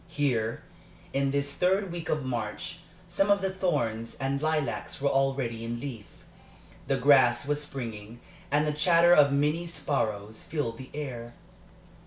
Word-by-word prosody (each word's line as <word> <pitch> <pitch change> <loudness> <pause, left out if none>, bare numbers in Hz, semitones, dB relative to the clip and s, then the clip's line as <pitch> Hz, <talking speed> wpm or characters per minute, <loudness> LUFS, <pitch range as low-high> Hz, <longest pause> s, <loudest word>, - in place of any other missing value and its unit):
Here, 125 -8 -1 0.5
in 135 0 +1
this 140 0 -1
third 185 +4 +1
week 170 -2 -6
of 150 -3 0
March, 120 +7 -4 0.3
some 195 +3 +1
of 200 0 +4
the 190 0 0
thorns 145 -12 -1
and 135 +1 -2
lilacs 155 -4 -1
were 140 0 +1
already 135 -4 0
in 120 +1 -4
leaf. 120 -6 -7 0.8
The 135 -1 +1
grass 130 -2 +5
was 145 0 0
springing, 115 -5 -7 0.3
and 150 +1 +2
the 150 - 0
chatter 170 +3 +5
of 145 -4 +6
many 150 +5 +1
sparrows 110 -10 -2
filled 130 -8 -3
the 130 - -9
air. 120 -5 -6
140 Hz, 150 wpm, -28 LUFS, 120-155 Hz, 0.8 s, of